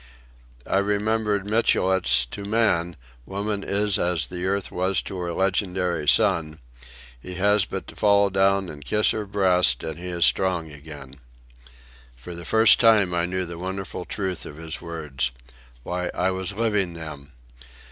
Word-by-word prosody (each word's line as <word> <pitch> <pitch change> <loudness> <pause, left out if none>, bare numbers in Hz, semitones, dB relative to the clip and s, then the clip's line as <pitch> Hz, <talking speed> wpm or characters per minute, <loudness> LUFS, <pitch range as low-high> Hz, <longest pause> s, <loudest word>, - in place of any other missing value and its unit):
I 95 - +1
remembered 105 0 0
Michelet's 95 - +2
"To 100 - -6
man, 100 -6 +1 0.3
woman 100 +1 -3
is 105 0 0
as 85 -3 0
the 90 0 -4
earth 100 0 -1
was 95 0 0
to - - -7
her 85 -1 -3
legendary 90 -3 -1
son; 75 0 +3 0.6
he 90 +7 -8
has 100 +1 +3
but 95 - -6
to - - -11
fall 100 -1 +3
down 95 0 +2
and 75 -3 -9
kiss 105 +9 +2
her 105 -2 -3
breast 95 -3 +2
and 80 0 -5
he 90 - -7
is 85 -1 +2
strong 90 -4 +1
again." 70 -2 -11 1.0
For - - -9
the 85 0 -8
first 110 +2 +5
time 105 -6 +4
I 85 0 0
knew 90 0 -2
the 85 -1 -8
wonderful 95 0 -5
truth 95 -4 -3
of 75 - -9
his 80 -1 -6
words. 75 -7 -3 0.5
Why, 90 +3 -3
I 95 +1 +1
was 95 +1 -3
living 105 -5 0
them. 75 -4 -9
95 Hz, 155 wpm, -24 LUFS, 85-100 Hz, 1.0 s, first